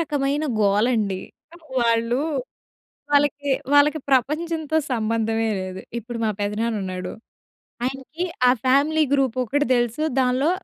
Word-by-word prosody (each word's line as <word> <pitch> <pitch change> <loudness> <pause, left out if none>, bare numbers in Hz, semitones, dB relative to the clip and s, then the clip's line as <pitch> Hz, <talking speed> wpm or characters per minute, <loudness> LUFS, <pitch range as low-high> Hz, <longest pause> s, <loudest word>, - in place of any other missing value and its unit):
రకమైన 290 -1 0 0.2
గోలండి. 205 -1 +2 0.6
వాళ్ళు 230 +1 +2 0.9
వాళ్ళకి, 285 0 +2 0.2
వాళ్ళకి 295 +2 +5
ప్రపంచంతో 310 +4 +1
సంబంధమే 225 -1 0
లేదు. 185 0 -6 0.2
ఇప్పుడు 235 +1 -7
మా 220 - +2
పెదనానున్నాడు, 205 -3 -2 0.7
ఆయనకి 270 +6 -4 0.2
ఆ - - +7 0.2
ఫ్యామిలీ 290 +4 +3
గ్రూ‌పోకటి 265 +1 +1
తెలుసు 240 +4 0 0.2
దానిలో 260 +4 +2
250 Hz, 95 wpm, -23 LUFS, 225-285 Hz, 0.9 s, ఆ